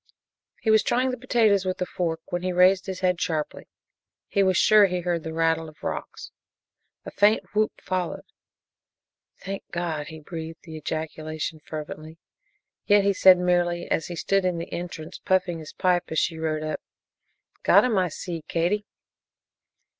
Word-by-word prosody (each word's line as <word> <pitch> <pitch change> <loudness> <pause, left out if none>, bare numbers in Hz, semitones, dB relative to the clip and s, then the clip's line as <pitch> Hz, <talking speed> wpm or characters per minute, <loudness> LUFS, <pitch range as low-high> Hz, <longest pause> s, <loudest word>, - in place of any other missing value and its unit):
He 220 - +2
was 220 0 +6
trying 255 +4 +1
the - - -2
potatoes 225 -6 +3
with 185 -1 -2
a 180 - 0
fork 165 -3 -2
when 175 - -1
he 185 0 -1
raised 185 +2 +4
his 185 -1 -5
head 180 -1 +1
sharply. 155 -3 -2 0.6
He 200 - +1
was 190 -2 +3
sure 210 -2 +6
he 180 -1 -2
heard 175 -1 -1
the 160 - -6
rattle 165 0 +1
of 155 - -20
rocks. - - -5 0.7
A - - -6
faint 210 +2 +3
whoop 215 0 0
followed. 185 -2 -3 1.2
"Thank 195 0 -5
God!" 165 -4 -3
He 160 -2 -9
breathed 160 +1 -8
the 160 -2 -9
ejaculation 155 0 -4
fervently, 155 +1 -7 0.7
yet 205 0 +5
he 200 0 +3
said 185 -1 +7
merely 175 -1 0
as 160 - 0
he 175 - -6
stood 195 +4 +1
in 180 -2 0
the 165 - -6
entrance 170 -1 -6
puffing 185 -3 0
his 155 - -9
pipe 180 -1 +1
as 160 - -4
she 160 +1 0
rode 155 -1 -1
up, 155 0 -3 0.8
"Got - - +6
'em, 225 -6 +2
I 185 - +2
see, 165 +1 -6
Katie!" 195 +5 0
175 Hz, 170 wpm, -25 LUFS, 160-190 Hz, 1.2 s, said